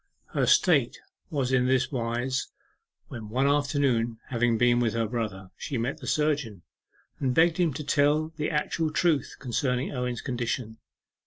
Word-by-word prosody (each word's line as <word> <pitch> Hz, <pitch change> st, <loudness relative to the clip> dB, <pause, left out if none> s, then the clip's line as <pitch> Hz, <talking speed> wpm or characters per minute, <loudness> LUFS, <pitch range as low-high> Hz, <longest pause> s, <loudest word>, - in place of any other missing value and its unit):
Her -, -, +1 dB
state -, -, +3 dB, 0.3 s
was 135 Hz, -4 st, -1 dB
in 125 Hz, -1 st, +3 dB
this 130 Hz, -1 st, +2 dB
wise, 120 Hz, +1 st, -1 dB, 0.6 s
when 110 Hz, -3 st, -7 dB
one 130 Hz, +5 st, +1 dB
afternoon, 140 Hz, -5 st, +1 dB
having 120 Hz, -2 st, +1 dB
been 120 Hz, +1 st, +4 dB
with 115 Hz, -2 st, 0 dB
her 115 Hz, -1 st, +1 dB
brother, 105 Hz, -5 st, -4 dB
she 135 Hz, -, -4 dB
met 120 Hz, +4 st, -2 dB
the -, -, -9 dB
surgeon, 145 Hz, -, 0 dB, 0.6 s
and 130 Hz, -2 st, 0 dB
begged 165 Hz, 0 st, +4 dB
him 175 Hz, -3 st, +2 dB
to 150 Hz, -, -4 dB
tell 150 Hz, +2 st, +2 dB
the 150 Hz, -1 st, -2 dB
actual 155 Hz, +1 st, 0 dB
truth 155 Hz, -4 st, +1 dB
concerning 125 Hz, +1 st, -1 dB
Owen's 125 Hz, -2 st, -3 dB
condition. 120 Hz, -3 st, -3 dB
125 Hz, 155 wpm, -27 LUFS, 115-145 Hz, 0.6 s, been